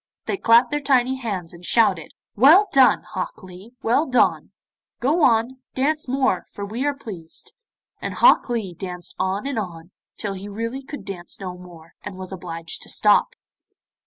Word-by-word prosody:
They -, -, -1 dB
clapped 235 Hz, -6 st, +4 dB
their 295 Hz, -, 0 dB
tiny 265 Hz, -2 st, +2 dB
hands, 195 Hz, -9 st, -4 dB
and 170 Hz, +1 st, -13 dB
shouted, 190 Hz, -5 st, +2 dB, 0.2 s
'Well 315 Hz, -, +7 dB
done, 265 Hz, -2 st, +5 dB
Hok 185 Hz, 0 st, -5 dB
Lee, 190 Hz, +6 st, -13 dB
well 250 Hz, +8 st, +2 dB
done, 255 Hz, -1 st, +2 dB, 0.5 s
go 295 Hz, +8 st, +1 dB
on, 250 Hz, -1 st, +3 dB, 0.2 s
dance 300 Hz, +3 st, 0 dB
more, 260 Hz, -7 st, 0 dB
for 200 Hz, -, -6 dB
we 225 Hz, +6 st, -4 dB
are 290 Hz, -, 0 dB
pleased.' 185 Hz, -11 st, -8 dB, 0.5 s
And -, -, -4 dB
Hok -, -, +5 dB
Lee 220 Hz, -7 st, -2 dB
danced 180 Hz, 0 st, -7 dB
on 190 Hz, +5 st, -1 dB
and 275 Hz, -4 st, -1 dB
on, 170 Hz, -3 st, -7 dB, 0.3 s
till 200 Hz, -2 st, -3 dB
he 195 Hz, +2 st, -8 dB
really 230 Hz, +6 st, -4 dB
could 290 Hz, +2 st, -9 dB
dance 180 Hz, -3 st, -7 dB
no 185 Hz, -2 st, -6 dB
more, 175 Hz, -2 st, -14 dB
and 185 Hz, -, -8 dB
was 185 Hz, 0 st, -8 dB
obliged 165 Hz, -3 st, -6 dB
to -, -, -8 dB
stop. -, -, +3 dB
220 Hz, 170 wpm, -22 LUFS, 180-260 Hz, 0.5 s, Well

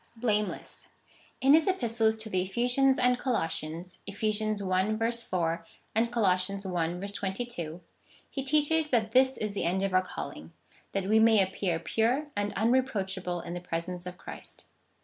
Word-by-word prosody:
Blameless. 210 Hz, -4 st, -2 dB, 0.5 s
In 270 Hz, +2 st, +6 dB
his 320 Hz, +3 st, +5 dB
Epistles 230 Hz, -11 st, +1 dB
to 220 Hz, -, -7 dB
the 185 Hz, -, +2 dB
Ephesians 245 Hz, +7 st, +2 dB
and 250 Hz, 0 st, +3 dB
Colossians 170 Hz, -, -2 dB
(Eph. 200 Hz, +2 st, -8 dB
i. 215 Hz, 0 st, +1 dB
4, 170 Hz, -8 st, -2 dB, 0.3 s
and 230 Hz, +2 st, +1 dB
Col. 235 Hz, -3 st, +1 dB
i. 180 Hz, -1 st, +5 dB, 0.8 s
22) 190 Hz, -5 st, -4 dB, 0.5 s
he 270 Hz, -, -4 dB
teaches 300 Hz, +2 st, +2 dB
that 225 Hz, -4 st, +1 dB
this 260 Hz, +2 st, +4 dB
is 210 Hz, -1 st, -3 dB
the 200 Hz, -, -2 dB
end 185 Hz, +3 st, 0 dB
of 195 Hz, -1 st, -1 dB
our 185 Hz, -, +5 dB
calling 80 Hz, -, -7 dB, 0.2 s
— -, -, -30 dB
that 195 Hz, -, 0 dB
we 215 Hz, +3 st, +4 dB
may 220 Hz, -1 st, +6 dB
appear 185 Hz, -2 st, -1 dB
pure 230 Hz, -, 0 dB
and 205 Hz, 0 st, -1 dB
unreproachable 195 Hz, -7 st, 0 dB
in 170 Hz, -, -6 dB
the 175 Hz, -, -5 dB
presence 175 Hz, +1 st, -4 dB
of 180 Hz, 0 st, -7 dB
Christ. -, -, -10 dB
210 Hz, 155 wpm, -29 LUFS, 185-240 Hz, 0.8 s, In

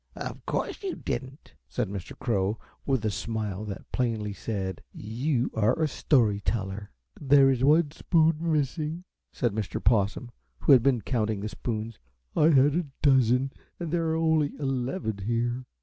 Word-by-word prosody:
"Of -, -, -6 dB
course -, -, -2 dB
you 385 Hz, -3 st, -3 dB
didn't," 135 Hz, +2 st, -6 dB, 0.2 s
said 125 Hz, -4 st, -1 dB
Mr. 95 Hz, -2 st, -7 dB
Crow, 105 Hz, -2 st, 0 dB, 0.3 s
with 130 Hz, -5 st, +1 dB
a 110 Hz, -, +1 dB
smile 105 Hz, -1 st, -3 dB
that 100 Hz, -2 st, -8 dB
plainly 110 Hz, -4 st, -1 dB
said: 95 Hz, -2 st, -4 dB
"You 125 Hz, +4 st, -1 dB
are 110 Hz, +8 st, +2 dB
a 160 Hz, -, +3 dB
story 120 Hz, -8 st, +2 dB
teller." 100 Hz, -1 st, -3 dB, 0.3 s
"There 135 Hz, -1 st, +5 dB
is 130 Hz, -1 st, 0 dB
one 150 Hz, +2 st, +4 dB
spoon 160 Hz, 0 st, +2 dB
missing," 155 Hz, +3 st, -1 dB, 0.3 s
said 120 Hz, -5 st, -1 dB
Mr. 105 Hz, -2 st, -3 dB
Possum, 110 Hz, +2 st, +1 dB, 0.3 s
who -, -, +4 dB
had 130 Hz, -3 st, +8 dB
been 125 Hz, -2 st, +2 dB
counting 110 Hz, -5 st, -1 dB
the 105 Hz, -, -3 dB
spoons. 110 Hz, 0 st, -4 dB, 0.4 s
"I 150 Hz, -, +4 dB
had 145 Hz, -2 st, +5 dB
a 170 Hz, -1 st, -1 dB, 0.2 s
dozen 130 Hz, -1 st, +4 dB, 0.3 s
and 170 Hz, -3 st, -4 dB
there 165 Hz, -1 st, +1 dB
are 160 Hz, -, +1 dB
only 160 Hz, -2 st, +2 dB
eleven 130 Hz, -, -2 dB
here." 120 Hz, +4 st, -1 dB
125 Hz, 160 wpm, -27 LUFS, 110-145 Hz, 0.4 s, had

